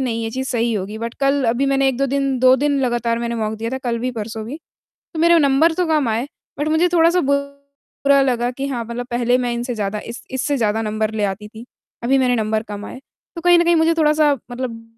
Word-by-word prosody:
नहीं, 230 -3 -2
ये 225 - -3
चीज़ 260 +3 -4
सही 235 -1 0
होगी, 210 +2 -4
बट 230 +1 -5
कल 275 0 +2
अभी 245 +4 +1
मैंने 275 0 +2
1-2 270 +1 0
दिन 275 -1 0
2 255 +1 +6
दिन 285 +1 +1
लगातार 240 -2 0
मैंने 235 0 -3
मॉक 215 -1 -2
दिया 230 +1 -3
था, 265 - -3
कल 240 -3 -2
भी, 250 +2 -2
परसों 220 -1 -5
भी। 275 +6 -6 0.6
तो - - -5
मेरे 340 +1 +5
वो - - +6
नंबर 285 +4 +4
तो 360 +1 0
कम 305 -5 +1
आए, 225 +4 -1 0.3
बट 295 +1 -1
मुझे 320 +3 +3
थोड़ा-सा 340 +2 +4
बुरा 280 0 -1
लगा 245 -2 0
कि 270 +2 -5
हाँ, 240 -4 -3
मतलब 240 +1 -5
पहले 245 +1 +1
मैं 245 -1 -1
इनसे 240 +1 -3
ज़्यादा 210 -1 -3
इस - - -10
इससे 265 +2 -1
ज़्यादा 220 -1 0
नंबर 215 0 -1
ले 210 -1 0
आती 205 +1 -4
थी, 225 +2 -11 0.4
अभी 270 +2 +3
मैंने 250 -1 +2
नंबर 220 0 0
कम 205 0 -6
आए। 255 - -9 0.4
तो 335 - -4
कहीं 350 0 +6
न 340 - +3
कहीं 340 0 +3
मुझे 320 +1 +3
थोड़ा-सा 300 -1 +4 0.2
मतलब 245 -2 -5
250 Hz, 240 wpm, -20 LUFS, 230-280 Hz, 0.6 s, 2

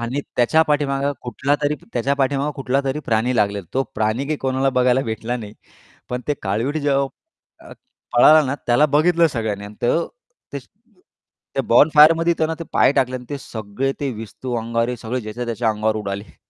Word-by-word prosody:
आणि 120 +5 -2 0.2
त्याच्या 155 +7 +4
पाठीमागे 140 -2 0 0.2
कुठलातरी 145 +4 -1 0.2
त्याच्या 130 +3 0
पाठीमागे 140 +2 0
कुठलातरी 135 +1 -1
प्राणी 120 +3 +1
लागलेला. 100 -3 0
तो 135 - +2
प्राणी 110 +5 -1
काय 155 - -1
कोणाला 135 0 0
बघायला 125 +1 +3
भेटला 115 +2 -3
नाही. 105 -4 -8 0.6
पण 125 0 -3
ते 145 - +2
काळवीट 115 +9 -1
जेव्हा 140 -2 +1 0.6
अ, - - -11 0.4
पळाला 155 +6 +7
ना 130 - -1
त्याला 125 +5 +4
बघितलं 165 +4 +3
सगळ्यांनी 110 -8 -3
अन् 105 +1 -10
तर 140 +8 +2 0.5
ते - - -3 1.0
त्या - - 0
बोनफायरमध्ये 160 +3 +6
त्यांना 160 0 0
ते 165 - -6
पाय - - +4
टाकले 130 -2 0
आणि 125 - -10
ते 145 - -3
सगळे 115 +3 -4
ते 140 -2 -1
विस्तू 115 +3 -7
अंगावर 115 +1 -1
सगळे 125 +3 -3
ज्याच्या 110 +2 -6
त्याच्या 115 0 -1
अंगावर 110 +1 -1
उडाले. 100 -1 -6
130 Hz, 165 wpm, -20 LUFS, 115-145 Hz, 1.0 s, पळाला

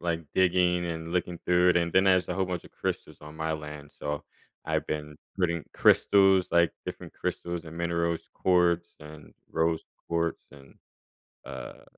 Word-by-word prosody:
like, 85 -1 -1
digging 90 -1 +3
and 80 0 -4
looking 90 -1 -1
through 90 0 +4
it, - - +2
and 85 -1 +1
then 95 +1 +5
there's 95 -1 +4
a 90 - -1
whole 95 0 +1
bunch 90 -2 -4
of - - -14
crystals - - -4
on 75 +1 -11
my 80 0 -1
land. 75 -1 -7
So, 75 0 -3 0.4
I've - - -1
been 75 -1 -4 0.2
putting 85 -3 +1
crystals, 95 -2 +5
like, 85 -1 +4
different - - -7
crystals 85 -1 -4
and 80 +1 -9
minerals, 85 -1 -1
quartz, 85 -2 +2
and 75 0 -12 0.2
rose 80 0 +1 0.3
quartz, 85 0 -1
and, 70 -1 -16 0.7
uh, 65 -2 -8
85 Hz, 165 wpm, -28 LUFS, 80-90 Hz, 0.7 s, then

